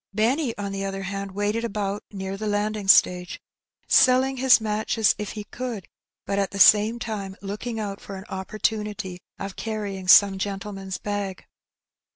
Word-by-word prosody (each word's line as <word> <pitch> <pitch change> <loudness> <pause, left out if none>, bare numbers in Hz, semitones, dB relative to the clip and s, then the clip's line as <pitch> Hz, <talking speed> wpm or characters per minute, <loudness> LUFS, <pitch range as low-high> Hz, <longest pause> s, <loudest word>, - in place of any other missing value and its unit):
Benny, 235 +4 +1
on 200 -1 -4
the 195 0 -4
other 195 0 -4
hand, 195 0 -5
waited 205 +3 -1
about 205 -2 -3
near 190 -1 -5
the 215 +2 -4
landing 210 0 -1
stage, 180 -2 +4 0.5
selling 260 +1 +4
his 255 -1 +6
matches 215 0 +1
if 210 -2 -4
he 210 - -6
could, 230 -2 -6 0.4
but 200 - -1
at 195 - 0
the 195 - -7
same 210 +4 +6
time 205 -5 -5
looking 210 +4 -5
out 200 -2 -5
for 195 - -8
an 190 +1 -9
opportunity 205 -2 -3 0.2
of 195 -1 -6
carrying 205 -4 -5
some 195 +1 +7
gentleman's 195 -1 -4
bag. 205 -2 -4
205 Hz, 160 wpm, -24 LUFS, 195-215 Hz, 0.5 s, some